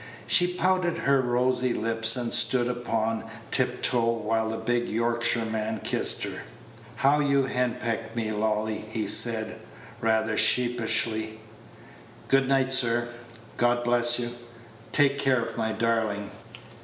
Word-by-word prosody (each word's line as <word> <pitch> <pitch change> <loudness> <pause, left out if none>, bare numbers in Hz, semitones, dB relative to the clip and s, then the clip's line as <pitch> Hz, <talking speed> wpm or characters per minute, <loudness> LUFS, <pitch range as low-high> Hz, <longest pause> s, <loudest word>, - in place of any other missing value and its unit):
She 175 - +4
pouted 180 -1 0
her 140 -1 +2
rosy 125 0 0
lips, 115 +1 +3
and 120 -2 -2
stood 120 +1 +4
upon 115 -2 -2 0.3
tiptoe, 125 -2 +1
while 110 0 -2
the 110 - -4
big 120 +2 -1
Yorkshireman 110 -2 -1
kissed - - +1
her. - - -5 0.5
"How 140 +4 +2
you 140 -2 +2
do - - -6
henpeck 115 -2 -2
me, 110 -2 -2
Lolly!" 110 0 -2
he 110 -1 -3
said, 110 +1 +1 0.4
rather 110 -1 0
sheepishly. 110 -2 +1 0.9
"Good 135 0 +2
night, 135 -1 +2
sir. 120 -1 +1 0.5
God 120 0 +1
bless 120 0 +2
you! 120 -1 -3 0.6
Take 140 -1 +3
care 135 -3 +2
of 115 - -5
my 110 0 -2
darling." 110 -3 -1
120 Hz, 130 wpm, -26 LUFS, 110-125 Hz, 0.9 s, She